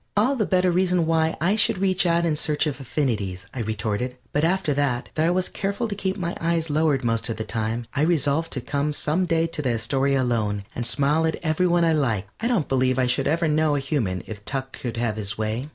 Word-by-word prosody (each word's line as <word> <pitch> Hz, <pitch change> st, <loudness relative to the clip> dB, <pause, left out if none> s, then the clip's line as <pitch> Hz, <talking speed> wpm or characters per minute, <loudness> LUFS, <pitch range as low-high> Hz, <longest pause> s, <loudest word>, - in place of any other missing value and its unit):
"All 245 Hz, +7 st, +3 dB
the 215 Hz, -6 st, 0 dB
better 185 Hz, -1 st, +3 dB
reason 180 Hz, -1 st, +2 dB
why 160 Hz, 0 st, +2 dB
I 185 Hz, +6 st, +2 dB
should 215 Hz, -2 st, +3 dB
reach 185 Hz, -1 st, +2 dB
out 170 Hz, 0 st, +2 dB
in 160 Hz, -2 st, +1 dB
search 150 Hz, +1 st, 0 dB
of 145 Hz, -2 st, -3 dB
affinities," 105 Hz, -9 st, -2 dB
I 130 Hz, -, -5 dB
retorted. 110 Hz, +3 st, -2 dB, 0.2 s
But 145 Hz, -, +1 dB
after 175 Hz, -2 st, +1 dB
that, 135 Hz, -3 st, -1 dB
though 160 Hz, +1 st, +1 dB
I -, -, +3 dB
was 180 Hz, +1 st, +1 dB
careful 200 Hz, +4 st, -2 dB
to 210 Hz, -, -3 dB
keep 190 Hz, -1 st, -2 dB
my 175 Hz, -2 st, -3 dB
eyes 165 Hz, -1 st, 0 dB
lowered 150 Hz, -3 st, +2 dB
most 115 Hz, 0 st, 0 dB
of 115 Hz, -, -3 dB
the 110 Hz, -, -3 dB
time, 110 Hz, +2 st, -2 dB
I 140 Hz, -, 0 dB
resolved 160 Hz, -1 st, +1 dB
to 130 Hz, -, -2 dB
come 140 Hz, +4 st, -1 dB
some 165 Hz, +5 st, 0 dB
day 165 Hz, -1 st, +2 dB
to 165 Hz, -2 st, -3 dB
the 130 Hz, -4 st, 0 dB
Astoria 135 Hz, +4 st, +1 dB
alone 105 Hz, -5 st, -1 dB
and 120 Hz, -1 st, -3 dB
smile 150 Hz, +5 st, +2 dB
at 160 Hz, -, -1 dB
every 160 Hz, +3 st, +2 dB
one 175 Hz, -1 st, +3 dB
I 165 Hz, -, +3 dB
liked. 110 Hz, -9 st, 0 dB
I 230 Hz, -, 0 dB
don't 225 Hz, -11 st, +1 dB
believe 130 Hz, -1 st, +1 dB
I 130 Hz, -, +3 dB
should 125 Hz, +2 st, +1 dB
ever 165 Hz, +2 st, +1 dB
know 155 Hz, -1 st, +2 dB
a -, -, +1 dB
human 130 Hz, -, -2 dB
if 105 Hz, -2 st, -8 dB
Tuck 135 Hz, +2 st, -4 dB
could 120 Hz, -2 st, -5 dB
have 115 Hz, -2 st, -1 dB
his 105 Hz, 0 st, -3 dB
way. 110 Hz, +6 st, -2 dB
145 Hz, 240 wpm, -24 LUFS, 120-170 Hz, 0.2 s, All